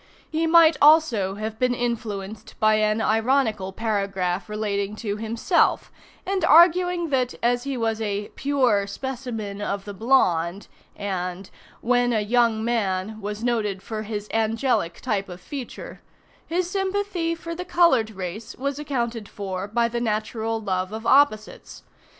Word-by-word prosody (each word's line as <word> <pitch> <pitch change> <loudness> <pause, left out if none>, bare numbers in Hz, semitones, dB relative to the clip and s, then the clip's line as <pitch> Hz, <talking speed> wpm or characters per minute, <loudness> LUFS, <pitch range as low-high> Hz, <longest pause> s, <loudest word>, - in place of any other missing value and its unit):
He 320 +1 0
might 330 -1 +6
also 285 -11 +5
have 215 +1 -5
been 250 -1 +2
influenced 220 -4 -4
by 215 0 +4
an 215 +1 +1
ironical 220 -3 +1
paragraph 195 -3 -2
relating 205 -1 -2
to 210 -2 -4
himself, 225 - +1 0.3
and 390 0 -1
arguing 345 +1 +5
that, 255 -2 0
as 245 +1 +1
he 275 -2 -3
was 225 -1 -1
a 205 -1 -2
"pure 250 -8 +1
specimen 225 -3 -5
of 200 -1 -3
the 205 - -6
blonde," 195 -6 +1 0.3
and 185 -1 -4 0.3
"when 245 0 +2
a 215 - +1
young 225 0 +2
man 215 -2 -1
was 210 +2 -5
noted 210 -6 -1
for 220 0 -5
his 210 -1 -5
angelic 225 -5 0
type 200 -2 -2
of 180 0 -8
feature," 265 +6 -8 0.5
his 345 +1 -1
sympathy 385 -3 -1
for 335 0 -7
the 355 +2 -5
colored 340 -11 +3
race 210 +4 -7
was 280 +2 -3
accounted 235 -7 -3
for 190 -1 -5
by 235 +3 +1
the 235 0 -3
natural 225 0 -2
love 185 -3 -2
of 220 +1 -6
opposites. 265 -6 +2
225 Hz, 145 wpm, -24 LUFS, 205-265 Hz, 0.5 s, might